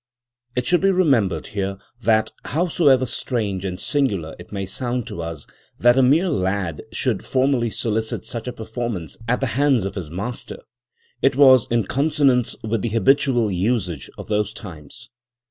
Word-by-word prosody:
It 125 0 -1
should 175 +4 +3
be 195 - +4
remembered 130 - +2
here 100 -1 -3 0.2
that, 110 -2 +2
howsoever 150 -5 +2
strange 110 -6 -2
and 90 -2 -4
singular 120 - -1
it 90 - -12
may 100 -2 -3
sound 120 +4 -3
to 85 - -6
us 80 -3 -6 0.3
that 120 +1 +5
a 135 - +4
mere 150 +9 +4
lad 95 - -1
should - - -1
formally 130 -3 +1
solicit 110 0 -2
such 115 0 -6
a - - -2
performance 110 - -5
at 125 +3 +1
the - - +2 0.2
hands 135 -8 +3
of 100 - -3
his 90 -6 -6
master, 100 +9 -5 0.6
it 135 - +3
was 130 -4 +6
in 120 -1 +2
consonance 140 -3 +2
with 110 -1 -1
the 115 - -1
habitual 120 0 +2
usage 90 - -1
of - - -8
those 105 0 0
times. 105 +5 -11
115 Hz, 165 wpm, -22 LUFS, 95-130 Hz, 0.6 s, was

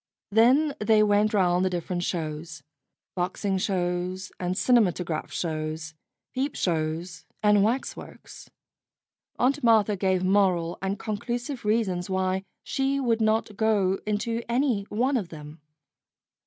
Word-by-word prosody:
Then 260 +8 +4
they 215 0 +4
went 210 0 +3
round 180 -3 +2
the 185 - +2
different 175 0 -3
shows 155 -3 -4 0.5
boxing 190 +2 -1
shows 185 0 -2
and 180 0 -1
cinematograph 185 -7 +1
shows, 155 -1 -3 0.4
peep 270 +2 -2
shows, 160 0 -2 0.2
and 210 -1 +5
waxworks. 240 +5 -4 0.9
Aunt 275 +3 +1
Martha 220 -3 +4
gave 190 -1 +1
moral 185 -3 +2
and 195 +1 -2
conclusive 240 +5 -4
reasons 205 -5 0
why 190 0 0 0.2
she 270 +1 0
would 230 -4 +1
not 215 -1 +1
go 200 -3 +2
into 230 +2 -1
any 240 -5 +1
one 255 +5 +1
of 195 -7 -4
them. 150 -1 -11
195 Hz, 120 wpm, -26 LUFS, 175-225 Hz, 0.9 s, and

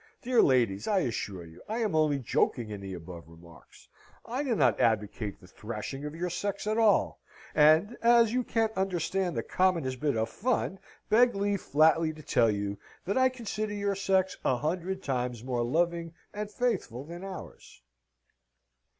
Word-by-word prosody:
Dear 245 -2 +4
ladies! 115 -7 +2
I 200 -3 +2
assure 105 - -3
you 80 0 -14
I 220 - -2
am 220 -6 0
only 155 -2 +3
joking 120 -2 0
in 100 -1 -6
the 95 -1 -6
above 85 -2 -10
remarks, 85 0 -17 0.4
I 250 +4 -3
do 260 -5 0
not - - +3
advocate 105 -1 0
the - - -16
thrashing 115 +8 -6
of 150 +1 -6
your 175 +1 -3
sex 200 +3 -3
at 215 +1 0
all, 215 -3 +3 0.3
and, 155 +9 +5
as 235 -1 +5
you 250 0 +1
can't 225 -2 0
understand 190 -1 -1
the - - -1
commonest 165 -9 0
bit 145 -5 0
of 110 0 0
fun, 200 - -1 0.3
beg 240 +2 +5
leave 200 -1 0
flatly 160 +2 +3
to 155 0 -12
tell 115 -4 +3
you, 100 -1 -2 0.3
that 195 - -1
I 260 0 +4
consider 215 -4 -4
your 200 0 0
sex 190 -1 +1
a 125 - +2
hundred 180 +6 -3
times 125 -4 -2
more 125 -2 -1
loving 165 +6 0 0.2
and 210 0 -4
faithful 210 - -2
than 170 +4 -9
ours. 190 - -10
165 Hz, 170 wpm, -29 LUFS, -, 0.4 s, and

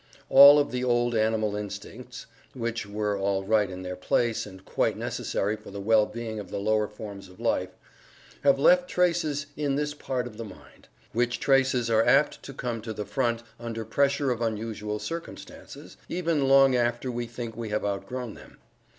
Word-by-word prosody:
All 140 +2 +10
of 145 - +1
the 125 0 -2
old 120 -1 +1
animal 110 -1 +1
instincts 105 -1 -7 0.3
(which 115 -3 -3
were 105 0 -1
all 100 0 -1
right 105 0 +2
in 95 0 -7
their 90 0 -5
place, 115 +5 0
and 95 -1 -13
quite - - 0
necessary 105 +2 -2
for 105 - -13
the 100 0 -7
well 110 +1 +3
being 110 -1 -6
of 105 - -8
the - - -4
lower 105 +1 +1
forms 100 -2 -9
of 90 - -17
life) 105 -6 0 0.7
have 140 -1 +4
left 180 +5 +4
traces 170 -5 +1
in 145 -2 -1
this 145 +1 -1
part 130 -3 -3
of 115 -4 -9
the 115 - -5
mind, 100 -4 -14 0.3
which 120 0 0
traces 130 -3 +2
are 110 0 +4
apt 135 +5 +3
to - - -9
come 120 -4 -4
to 110 0 -5
the 105 -1 -5
front 120 +2 -1 0.2
under 115 -1 -5
pressure 140 +3 +1
of 120 -1 -3
unusual 110 -1 -3
circumstances, 165 +9 -8
even 165 -5 0
long 135 -1 +6
after 120 +1 0
we 120 0 -4
think 115 -1 -7
we 115 -2 -5
have 105 0 -1
outgrown 110 +4 -4
them. - - -15
115 Hz, 185 wpm, -27 LUFS, 105-135 Hz, 0.7 s, All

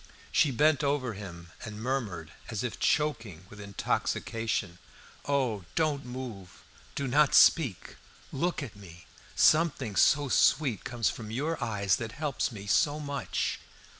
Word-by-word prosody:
She 150 - +4
bent 150 +3 +3
over 140 -4 0
him, 85 -4 -9
and 105 0 -7
murmured, 110 - -3 0.2
as 115 0 -3
if 120 - -4
choking 115 - 0
with 105 0 -10
intoxication 100 -1 -2 0.5
"Oh, 130 -8 0
do 155 -1 +3
not 140 - -13
move! 120 -8 -8 0.3
do 140 - -2
not 145 +3 +4
speak! 130 - +4 0.3
look 170 +2 -1
at 120 -7 -8
me! 90 -4 -13 0.3
Something 150 -9 +3
so 145 +6 +4
sweet 130 -3 +2
comes 120 -2 0
from 110 -2 -8
your 145 +8 -2
eyes 100 -5 +1
that 115 -2 -6
helps 145 -5 -2
me 100 -3 -8
so 145 +9 +2
much!" 140 -2 -2
120 Hz, 140 wpm, -29 LUFS, 100-145 Hz, 0.5 s, She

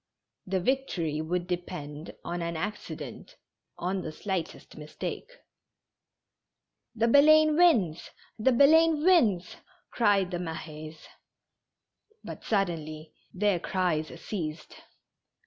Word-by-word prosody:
The 190 0 0
victory 180 - -1
would 175 +2 -2
depend 175 -4 -6
on 175 0 -4
an 170 -1 -3
accident, 205 +5 -6 0.4
on 185 +2 -2
the 160 - -5
slightest 185 0 -5
mistake. 155 - -6 1.7
"The 230 0 +2
Baleine 310 +4 +6
wins! 230 - +3 0.3
The 260 +5 +3
wins 300 - +5
1 - - -22
" - - -34
cried 200 -5 +2
the 175 - -2
Mahes. 155 -2 -7 1.2
But - - -9
suddenly 160 -6 -2 0.2
their 195 -1 +1
cries 170 -3 -1
ceased. 155 -6 -6
180 Hz, 100 wpm, -28 LUFS, 160-230 Hz, 1.7 s, Baleine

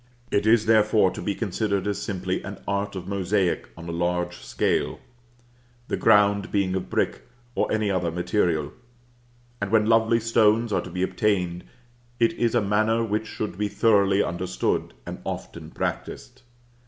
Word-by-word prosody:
It 100 +1 +1
is, 110 -1 +5
therefore, 110 -3 +4
to - - -7
be 100 - -2
considered 100 -2 -1
as 105 -1 -2
simply 95 -3 -2
an - - -7
art 100 0 -1
of 90 -1 -6
mosaic 95 -1 0
on 85 0 -9
a - - -3
large 90 +1 -1
scale, - - -1 0.9
the - - 0
ground 100 -2 +3
being 95 -2 +1
of 95 - -3
brick, - - -1 0.3
or - - 0
any 110 -2 +1
other 90 -3 0
material; 85 -3 0 0.9
and 100 - -1
when 110 0 +3
lovely 115 +1 +3
stones 115 0 +2
are - - +2
to - - -9
be 90 - -2
obtained, 90 -4 0 0.5
it 115 -1 +3
is 120 0 0
a 120 - +4
manner 110 +3 +2
which 110 0 -2
should 105 -3 -5
be 105 - +1
thoroughly 100 -1 +3
understood, 85 +1 -2
and - - -6
often - - -6
practised. 130 +2 -5
100 Hz, 160 wpm, -25 LUFS, 95-110 Hz, 0.9 s, is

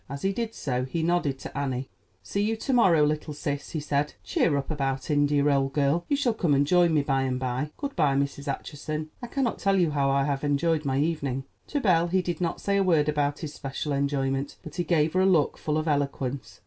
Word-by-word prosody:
As 140 +1 -6
he 195 +1 +1
did 225 +1 -3
so, 125 -3 -2
he 160 +5 -2
nodded 170 -5 +1
to - - -9
Annie. 135 -2 -2 0.4
"See 200 - -2
you 220 +2 +1
to 260 +4 -2
morrow, 175 -11 +5
little 150 0 -2
sis," 145 -1 -3
he 160 - -3
said. 150 0 -1
"Cheer 145 -4 +1
up 140 +1 -3
about 135 -2 -2
India, 145 0 +3
old 135 -1 +2
girl; 145 +4 +1
you 285 - +2
shall 255 -5 +1
come 175 -9 +1
and 140 +1 +3
join 175 +2 +4
me 150 -3 +2
by 135 -2 +1
and 130 -1 -1
by.—Good 150 - -3
by, 150 -5 +2
Mrs. 140 +1 -2
Acheson; 155 +2 -5
I 245 - -5
cannot 255 -1 -1
tell 195 0 +2
you 175 -4 +3
how 140 -2 +1
I 135 0 +2
have 140 0 -1
enjoyed 150 +2 +1
my 135 -1 0
evening." 140 -4 -1 0.2
To 290 - -1
Belle 175 -8 +3
he 185 +1 +1
did 175 -1 -3
not 170 -2 -1
say 200 0 0
a 195 - +3
word 160 -5 +3
about 145 -1 0
his 155 -3 -5
special 140 +1 -4
enjoyment; 140 0 -1
but 155 - -10
he 175 - +1
gave 160 -3 +2
her 185 - +3
a - - +4
look 165 -7 +3
full 150 0 -1
of 155 +1 -2
eloquence. 140 -2 -2
150 Hz, 235 wpm, -26 LUFS, 140-170 Hz, 0.4 s, morrow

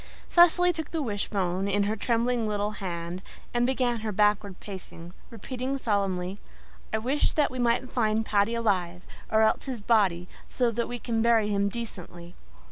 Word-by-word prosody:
Cecily 355 +1 +5
took 320 -2 -5
the 325 - -2
wishbone 195 -4 -1
in 200 +1 +2
her 210 +2 0
trembling 235 +1 0
little 205 0 -1
hands 175 -1 -4 0.3
and 240 0 +2
began 250 -3 0
her 215 0 -3
backward 210 -1 +1
pacing, 180 -3 -9 0.2
repeating 255 +4 -4
solemnly, 195 -5 -1 0.5
"I 220 - +1
wish 260 +7 0
that 300 -2 +2
we 255 - -5
may 235 -1 +2
find 220 -3 0
Paddy 210 +2 +2
alive, 185 -6 -1 0.3
or 220 0 +4
else 220 - +2
his 260 -4 -4
body, 200 -5 +2 0.2
so 245 -2 0
that 235 +1 -2
we 245 - -4
can 230 -1 -1
bury 225 -2 +3
him 200 0 +1
decently." 180 -6 -8
215 Hz, 165 wpm, -27 LUFS, 195-240 Hz, 0.5 s, Cecily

